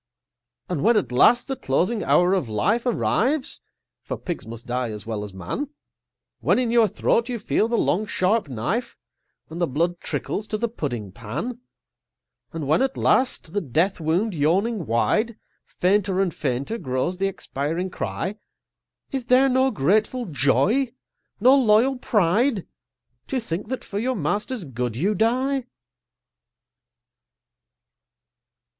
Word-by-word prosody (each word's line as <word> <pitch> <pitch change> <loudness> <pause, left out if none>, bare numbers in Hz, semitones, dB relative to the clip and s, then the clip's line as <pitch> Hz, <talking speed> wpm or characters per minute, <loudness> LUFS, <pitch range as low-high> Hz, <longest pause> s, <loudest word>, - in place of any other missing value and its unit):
And 175 -6 -2
when, 230 +2 +4
at 200 - 0
last, 240 - +5
the 270 - -2
closing 195 - 0
hour 180 +2 +4
of 180 -11 0
life 205 - +1
Arrives 255 +4 +1 0.4
(for - - -5
Pigs 175 - -5
must 115 +1 -9
die 125 0 -2
as 105 -2 -6
well 110 -2 -3
as 105 - -7
Man), 95 - -4 0.7
When - - +2
in 245 -2 +1
your 235 -2 +5
throat 230 +5 +1
you 245 - -2
feel 215 0 +1
the 235 0 0
long 210 +4 +1
sharp 190 -2 +1
knife, 135 - -2 0.5
And 170 +2 -5
the 170 - +2
blood 170 +6 0
trickles 210 - -3
to 215 - -2
the 235 +2 0
pudding 125 - -4
pan; 120 - -5 0.9
And 160 -4 -4
when, 155 - +3
at 265 0 0
last, 250 -10 +1
the 205 - 0
death 170 +8 0
wound 175 +7 0
yawning 180 +5 +1
wide, 215 - +1 0.3
Fainter 190 0 +1
and 190 -4 +1
fainter 140 - -2
grows 130 +7 -2
the 195 - +2
expiring 175 -1 -3
cry, 110 - -3 0.7
Is 265 -3 -3
there 255 +2 +5
no 260 +1 +3
grateful 215 - +1
joy, 195 - +2 0.5
no 250 +6 +6
loyal 250 +1 +4
pride, 210 +2 +2 0.6
To 265 - -1
think 190 -5 -4
that 255 -2 -4
for 200 - -4
your 255 +3 0
master's 210 +2 -2
good 125 -3 -3
you 190 - +1
die? 255 +5 +1
195 Hz, 145 wpm, -24 LUFS, 145-235 Hz, 0.9 s, no